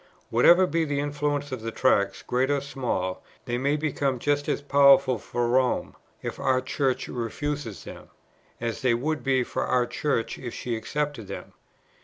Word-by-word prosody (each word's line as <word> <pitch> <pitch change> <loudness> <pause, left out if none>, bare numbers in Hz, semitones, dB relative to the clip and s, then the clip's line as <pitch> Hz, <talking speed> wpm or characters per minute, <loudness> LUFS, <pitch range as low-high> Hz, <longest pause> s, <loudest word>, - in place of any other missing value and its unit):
Whatever 170 +11 +6
be 165 0 0
the 145 -2 -1
influence 145 0 -2
of 130 -3 -4
the 115 - -3
Tracts, - - +1
great 130 +2 0
or 145 -1 +2
small, 125 -10 -3 0.2
they 120 0 -2
may 140 +3 +1
become 145 -3 -1
just 145 +3 0
as - - +1
powerful 140 -3 +5
for 120 +3 -2
Rome, 125 +1 +1 0.3
if - - -5
our 130 -2 +2
Church 130 0 -1
refuses 120 - -4
them, - - -11 0.5
as 115 +3 -3
they 125 -3 +3
would 150 +6 -2
be 130 -2 +2
for - - -3
our 125 -1 +2
Church 120 -1 -2
if 120 -2 -6
she 120 -2 -3
accepted 145 0 -3
them. 100 - -8
135 Hz, 170 wpm, -26 LUFS, 120-145 Hz, 0.5 s, Whatever